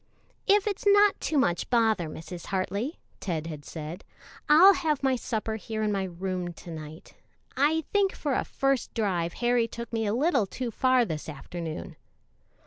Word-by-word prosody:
"If 405 0 +5
it's 410 -2 -2
not 405 0 +5
too 310 - 0
much 175 -11 +1
bother, 220 -8 +2
Mrs. 165 +3 -8
Hartley," 200 - -2 0.2
Ted 165 -5 -3
had 155 -3 -7
said, 160 +5 -7 0.5
"I'll 350 +7 +9
have 305 -6 -1
my 265 -1 +3
supper 220 -2 -3
here 220 0 -4
in 210 - +1
my 195 -1 0
room 180 0 -4
to 170 - -11
night. 155 0 -9 0.4
I 300 +4 +2
think 400 -2 +3
for 290 -3 -2
a - - +1
first 275 -2 -1
drive 180 -6 0
Harry 240 -1 +1
took 235 0 -8
me 225 -1 0
a 205 - +1
little 265 - +2
too 245 +3 -4
far 255 +1 +3
this 160 -5 -5
afternoon." 160 +2 -6
220 Hz, 170 wpm, -27 LUFS, 175-275 Hz, 0.5 s, I'll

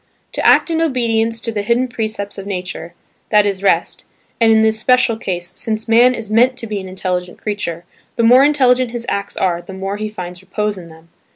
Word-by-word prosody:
To - - -3
act - - +5
in 325 0 0
obedience 230 -6 0
to 230 - -3
the 210 -2 -2
hidden 235 +5 +1
precepts 215 -4 -4
of 195 - -8
nature–that 185 +2 -2
is 195 -2 -2
rest; 200 - 0 0.3
and 225 -1 +5
in 220 0 +5
this 220 0 +2
special 250 0 +3
case, 180 -6 -4
since 220 0 -3
man 240 +3 +5
is 220 -2 -6
meant 245 +3 +3
to 235 - -5
be 210 -2 -3
an 190 -1 -8
intelligent 180 -1 -3
creature, 200 -5 -4 0.3
the 235 - 0
more 250 +4 +7
intelligent 255 -4 +3
his 235 0 -5
acts 200 0 -3
are 175 -2 0
the 190 - -11
more 195 +1 -4
he 215 0 -4
finds 180 -4 -8
repose 210 +2 -2
in 180 -3 -10
them. 160 0 -17
215 Hz, 205 wpm, -17 LUFS, 190-235 Hz, 0.3 s, more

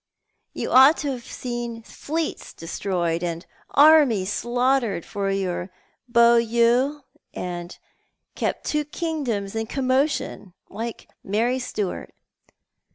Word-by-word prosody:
You - - -4
ought 265 +5 +7
to 280 - 0
have 245 -3 -6
seen 240 -2 -5
fleets 315 +7 -4
destroyed 170 0 -2
and 170 0 -3 0.2
armies 280 -10 +5
slaughtered 245 -6 0
for 200 -1 -3
your 190 -2 -2 0.4
beaux 235 0 +5
yeux, 235 +5 +2 0.3
or 175 -1 -4 0.7
kept - - -3
two 300 0 0
kingdoms 285 - -3
in 225 0 -2
commotion, 260 - -1 0.2
like 230 +1 -6 0.2
Mary 230 +6 0
Stuart. 210 -6 -4
235 Hz, 105 wpm, -23 LUFS, 195-265 Hz, 0.7 s, ought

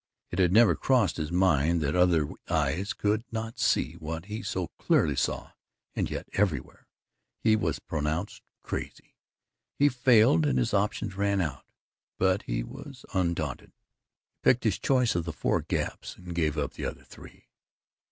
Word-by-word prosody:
It 85 - -3
had 90 -2 +4
never 115 +3 +6
crossed 120 -10 +2
his 80 0 -3
mind 85 -3 +3
that 70 +1 0
other 90 -4 +3 0.2
eyes 80 +4 0
could 105 +2 0
not 115 0 -5
see - - +2
what 80 +2 -5
he 105 +2 -5
so 95 -4 -3
clearly - - +2
saw - - -2 0.4
and - - -1
yet - - -5
everywhere 95 -10 -1 0.5
he 110 -1 +3
was 80 -10 -1
pronounced 80 +5 -3 0.2
crazy. - - -6 0.6
He 145 +1 +5
failed 120 - +4
and 65 -2 +1
his 60 - 0
options 100 -1 0
ran 100 0 +1
out, 75 -7 -3 0.5
but 95 +1 +2
he - - -2
was 135 - -10
undaunted. 85 -7 -2
He - - -58
picked 125 - +3
his 105 -3 +1
choice 125 -1 +2
of 85 - -1
the 85 - -3
four 70 - 0
gaps - - -3
and 90 -1 -9
gave 80 -3 0
up 75 - -2
the - - -5
other - - -5
three. - - -15
90 Hz, 160 wpm, -28 LUFS, 80-110 Hz, 0.6 s, never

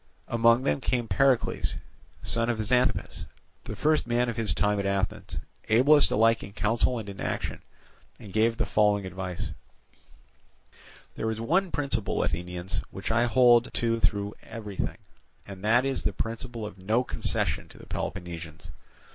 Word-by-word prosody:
Among 115 +1 +4
them 140 - 0
came 125 -3 0
forward 135 0 +4
Pericles, - - -2 0.5
son 115 0 +1
of 120 - 0
Xanthippus, 125 +3 0 0.4
the 110 - -5
first 155 +3 +1
man 120 +1 +1
of 115 - -3
his 115 -2 +1
time 105 0 +1
at 100 - -2
Athens, 100 0 -2 0.3
ablest 140 +7 +6
alike 115 +1 +3
in 100 - -9
counsel 115 +4 +2
and 110 -3 -6
in 100 -1 -8
action, - - -3 0.6
and 100 -3 -12
gave 115 +2 +2
the - - 0
following 105 -2 +2
advice: 95 -1 -5 1.6
"There 110 - -2
is 110 0 -3
one 180 +11 +1
principle, 140 -10 -1
Athenians, 90 +2 -3
which - - -5
I 120 +2 +3
hold 120 0 +5
to 115 -1 +1
through 100 -2 0
everything, 105 -4 -5 0.5
and 100 -1 -10
that 120 +4 +3
is 135 -1 -1
the - - 0
principle 115 0 -4
of 105 -2 -9
no 110 +7 +1
concession - - -1
to - - -16
the - - -13
Peloponnesians. 85 -3 -6
115 Hz, 155 wpm, -27 LUFS, 100-120 Hz, 1.6 s, ablest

